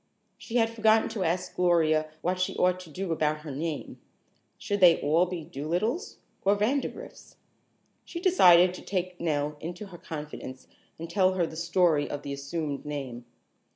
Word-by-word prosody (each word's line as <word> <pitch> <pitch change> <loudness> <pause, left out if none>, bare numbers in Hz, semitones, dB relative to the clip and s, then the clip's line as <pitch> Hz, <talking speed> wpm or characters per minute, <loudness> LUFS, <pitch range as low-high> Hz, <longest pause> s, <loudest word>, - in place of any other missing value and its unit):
She 230 - -9
had 225 -2 +3
forgotten 220 -1 +3
to 220 -4 -3
ask 180 +2 -2
Gloria 160 -3 +2
what 180 +1 0
she 185 - -1
ought 180 0 +2
to 180 -3 -11
do 180 +3 -4
about 155 -1 0
her 150 -2 -7
name. 155 +3 -5 0.6
Should 205 -1 -2
they 180 -3 +7
all 165 +5 +2
be 175 -2 -5
Dolittles 175 - -3 0.3
or 200 +1 +4
Vandergrifts? 255 +7 -3 0.7
She 340 - -7
decided 180 - +6
to - - -9
take 185 -2 -3
Nell 150 -2 -1
into 175 +6 -6
her 175 -2 -11
confidence 150 -4 -8 0.3
and 165 - -6
tell 185 +2 +2
her 175 -2 +2
the 160 - -8
story 170 -3 +2
of 145 0 -5
the 140 - -4
assumed 140 +1 -4
name. 135 -5 -6
170 Hz, 165 wpm, -28 LUFS, 150-185 Hz, 0.7 s, they